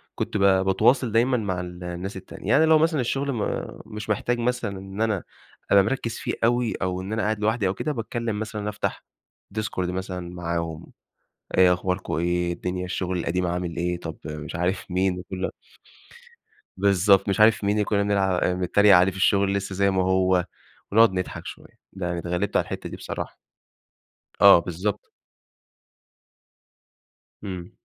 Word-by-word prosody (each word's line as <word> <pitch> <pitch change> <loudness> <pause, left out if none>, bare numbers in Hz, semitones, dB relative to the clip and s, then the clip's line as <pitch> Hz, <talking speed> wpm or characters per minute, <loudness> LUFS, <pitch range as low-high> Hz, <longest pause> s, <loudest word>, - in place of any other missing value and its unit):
كنت - - -2
ب - - -1
باتواصل 100 +6 +3
دايمًا 120 +3 +3
مع 95 -5 -2
الناس 90 +2 -6
التانية، 95 - -10
يعني 160 +4 +5
لو 160 0 +6
مثلًا 160 -4 +2
الشغل 135 +3 -1
م 110 -4 -2 0.4
مش 105 -1 -8
محتاج 120 +3 0
مثلًا 120 -5 -1
إن 95 +2 -7
أنا 105 -5 0 0.5
أبقى 100 -1 +7
مركّز 115 +1 -2
فيه - - -3
أوي 120 0 +2
أو 90 0 -1
إن 95 +3 -5
أنا 110 - 0
قاعد 110 0 0
لوحدي 105 -1 +1
أو 95 - 0
كده، 155 - -3
باتكلّم 115 -3 -3
مثلًا، 105 -1 -4
أفتح 105 0 -3 0.5
ديسكورد 105 -4 -2
مثلًا 90 -1 -5
معاهم، 85 -2 -4 0.7
إيه 90 -1 +7
أخباركم، 90 +1 -3
إيه 85 +2 0
الدنيا، 90 +1 -3
الشغل 90 0 -2
القديم 90 +2 -1
عامل 90 -1 -3
إيه؟ 90 0 -1
طب 80 -2 -6
مش 75 +3 -6
عارف 90 +2 -2
مين، 90 0 +1
وكل 95 0 -7
ده. - - -1 1.3
بالضبط 100 0 +4
مش 95 - 0
عارف 110 0 +5
مين 100 +1 +2
اللي 105 -1 +1
كنا 100 -1 +1
بنلع 95 -3 +1
بنتريق 95 +2 +4
عليه 90 +2 +5
في 95 - -10
الشغل 100 0 +3
لسّه 100 -1 -3
زي 100 +1 +2
ما 95 -1 +1
هو 95 -1 +2 0.5
ونقعد 115 +1 +6
نضحك 90 -1 -4
شويّة، - - -9 0.3
يعني 90 -2 -3
اتغلبت 90 +4 -2
على - - +2
الحتّة - - -6
دي - - -7
بصراحة. - - -6 1.0
آه 100 -3 +9
بالضبط 90 +4 -3 2.3
إمم. 90 -3 -6
95 Hz, 160 wpm, -24 LUFS, 90-105 Hz, 2.3 s, آه